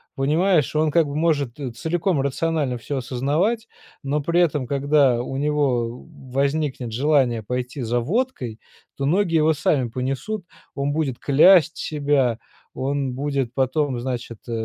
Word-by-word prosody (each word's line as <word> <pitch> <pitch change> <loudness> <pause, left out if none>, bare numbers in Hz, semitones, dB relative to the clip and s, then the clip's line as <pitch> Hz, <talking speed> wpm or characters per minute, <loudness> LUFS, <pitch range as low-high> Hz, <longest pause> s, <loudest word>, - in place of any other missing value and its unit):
понимаешь. 155 +3 +2
Он 155 0 +2
как 165 0 +4
бы 145 - -6
может 150 -6 0 0.2
целиком 165 - 0
рационально 140 -1 -1
всё 140 +4 -4
осознавать, 145 - -1 0.3
но 145 +1 -1
при 170 +4 +1
этом 150 -6 +1
когда 140 -2 +2
у 135 +2 -5
него 135 -5 0 0.3
возникнет 140 -3 -1
желание 125 -3 +2
пойти 125 +4 -4
за 120 +2 0
водкой, 135 - -2 0.4
то 135 - -2
ноги 175 +2 +2
его 160 0 +4
сами 140 -4 +1
понесут, 135 - -3 0.3
он 140 +1 -1
будет 145 -6 -2
клясть 165 +4 +5
себя, 140 -6 0 0.3
он 135 -1 -2
будет 135 -2 -2
потом 135 -1 0
значит, 120 -3 -4
э, - - -6
140 Hz, 140 wpm, -22 LUFS, 125-155 Hz, 0.4 s, клясть